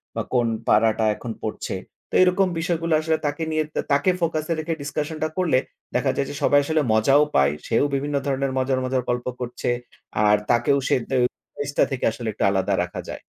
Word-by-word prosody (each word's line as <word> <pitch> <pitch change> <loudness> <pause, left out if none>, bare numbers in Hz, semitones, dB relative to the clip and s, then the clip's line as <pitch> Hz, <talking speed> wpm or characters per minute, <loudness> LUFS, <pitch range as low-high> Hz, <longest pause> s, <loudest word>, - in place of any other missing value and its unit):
বা - - -1
কোন 120 -2 +3 0.2
পাড়াটা 110 +1 +3
এখন 120 - -6
পড়ছে। 110 - -3 0.3
তো - - -27
এরকম 185 +1 +3
বিষয়গুলো 165 -1 0
আসলে 160 0 +1
তাকে 145 +3 -2
নিয়ে 155 0 +1
তা - - +1
তাকে 145 +6 +3
focus 160 -2 0
এ - - +4
রেখে 165 +1 -2
discussion 150 +2 -3
টা - - +2
করলে 175 -8 +3 0.4
দেখা 130 +1 +2
যায় 140 - -1
যে - - -6
সবাই 145 - +5
আসলে 155 +1 +1
মজাও 135 +7 +5
পায়। 70 +1 +4 0.2
সেও 115 - +2
বিভিন্ন 145 +1 -2
ধরনের 135 0 0
মজার, 130 0 +1
মজার 130 0 0
গল্প 125 0 -1 0.2
করছে। 125 0 -3 0.6
আর 105 0 +5
তাকেও 120 +4 +3
সে - - +3
দে 135 - +1 0.4
ফেসটা 145 0 0
থেকে 135 - -1
আসলে 115 0 -6
একটু - - -3
আলাদা 95 0 +1
রাখা 90 - -7
যায়। - - -6
140 Hz, 200 wpm, -23 LUFS, 120-155 Hz, 0.6 s, সবাই